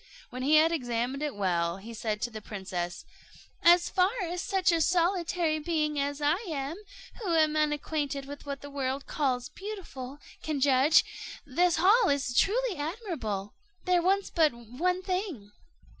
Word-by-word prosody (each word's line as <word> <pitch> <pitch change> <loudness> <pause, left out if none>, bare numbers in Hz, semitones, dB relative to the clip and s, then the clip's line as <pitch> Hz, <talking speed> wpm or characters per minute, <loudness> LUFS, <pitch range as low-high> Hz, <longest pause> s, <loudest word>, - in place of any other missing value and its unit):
When 255 - -6
he 290 +4 +4
had 315 +2 +6
examined 250 -2 -2
it 295 -5 -2
well, 175 -3 0
he 220 +4 -10
said 215 0 -3
to 240 - -2
the 215 -1 -7
princess, 185 -4 -5 0.6
"As 345 0 +6
far 365 0 +3
as 350 +1 -3
such 375 -2 +2
a 335 -1 +2
solitary 345 -2 +1
being 305 -2 -1
as 285 +1 -2
I 300 +4 +3
am, 285 +1 -3 0.4
who 360 -6 0
am 310 -1 +3
unacquainted 295 -2 -1
with 285 +1 -9
what 280 -1 -5
the 285 - -9
world 275 0 -2
calls 250 -4 -1
beautiful, 340 -11 -7 0.2
can 305 -2 -2
judge, 275 +3 +5 0.4
this 345 +5 +2
hall 400 +6 +5
is 275 -3 0
truly 465 - +2
admirable; 290 - -4 0.3
there 360 -1 +3
wants 390 +3 +1
but 320 -3 +4
one 300 +11 -2
thing." 365 - -3
295 Hz, 160 wpm, -29 LUFS, 255-345 Hz, 0.6 s, had